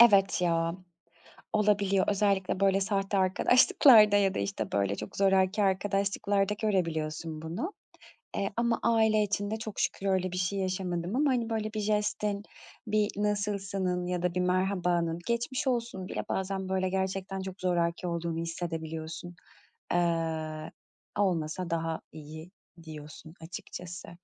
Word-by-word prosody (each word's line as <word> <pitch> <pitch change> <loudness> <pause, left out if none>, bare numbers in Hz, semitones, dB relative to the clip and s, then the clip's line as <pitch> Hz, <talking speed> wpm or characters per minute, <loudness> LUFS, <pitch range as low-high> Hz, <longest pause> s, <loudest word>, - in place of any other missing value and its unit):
Evet 200 -6 +6
ya. 165 0 +1 0.8
Olabiliyor. 200 -2 +3
Özellikle 195 -2 +1
böyle 195 0 +4
sahte 195 +1 0
arkadaşlıklarda 210 +3 +6
ya 195 -2 +3
da, - - -2
işte, 100 +1 -3
böyle 100 0 +1
çok 105 - -7
zoraki 195 +1 +3
arkadaşlıklarda 200 +1 +1
görebiliyorsun 160 -5 -1
bunu. 175 - -4 0.7
Eee, 200 - -1
ama 235 0 +1
aile 220 -2 +4
için 205 0 -1
de 220 - -1
çok 215 -2 -6
şükür 195 - -1
öyle 185 -1 +1
bir 180 - -4
şey 185 +2 0
yaşamadım 185 0 -2
ama, 290 +2 +3
hani, 235 -3 0
böyle 215 -1 -2
bir 215 - -2
jestin, 210 -1 0 0.4
bir 210 0 +2
nasılsının 200 -3 -1
ya 180 -1 -2
da 180 -1 0
bir - - +1
merhabanın, 180 -2 +1
geçmiş 240 +4 -1
olsunun 235 -7 -1
bile - - -3
bazen 190 0 -2
böyle 185 0 +1
gerçekten 190 0 -2
çok 190 0 -7
zoraki 175 0 0
olduğunu 170 -1 -2
hissedebiliyorsun. 165 0 -5 0.6
Iıı, 160 -2 -1 0.5
"Olmasa 180 -2 0
daha 165 -1 -2
iyi," 155 +2 -10 0.3
diyorsun 155 0 -10
açıkçası. 175 +1 -8
190 Hz, 135 wpm, -29 LUFS, 170-205 Hz, 0.8 s, Evet